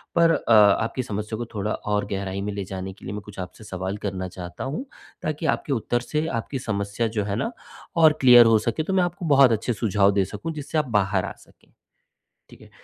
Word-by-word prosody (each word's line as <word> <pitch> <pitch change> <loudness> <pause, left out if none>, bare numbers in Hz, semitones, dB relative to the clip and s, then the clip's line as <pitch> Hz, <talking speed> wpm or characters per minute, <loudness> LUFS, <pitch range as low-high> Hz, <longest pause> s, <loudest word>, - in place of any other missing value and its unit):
पर 170 -1 +5
अ, 145 -6 -1
आपकी 110 +4 +4
समस्या 105 0 -4
को 120 - -4
थोड़ा 105 +1 -2
और 105 -1 -1
गहराई 95 0 -3
में 105 0 -3
ले 100 - -4
जाने 95 0 -6
के - - -15
लिए, 95 - -5
मैं 105 - -5
कुछ 105 -2 -11
आपसे 90 +4 -8
सवाल 95 0 -4
करना 95 -2 -3
चाहता 90 -1 -7
हूँ, 145 - -4 0.4
ताकि 155 +1 -3
आपके 140 - -4
उत्तर 120 0 0
से 150 +5 -2
आपकी 130 0 -3
समस्या 100 +1 -2
जो 105 - +2
है 100 0 -2
ना, 230 - -2 0.4
और 160 -2 +6
क्लियर 120 -2 +9
हो 115 -1 +5
सकें, 115 +8 -1
तो 190 - -2
मैं 185 -1 +3
आपको 175 0 -3
बहुत 135 -3 +7
अच्छे 115 +2 0
सुझाव 105 -2 +2
दे 100 -1 +1
सकूँ, 105 - -6
जिससे 150 +1 -4
आप 155 - +2
बाहर 95 -1 0
आ - - -5
सकें, - - -24 0.8
ठीक - - -16
है। - - -16
105 Hz, 225 wpm, -24 LUFS, 100-135 Hz, 0.8 s, क्लियर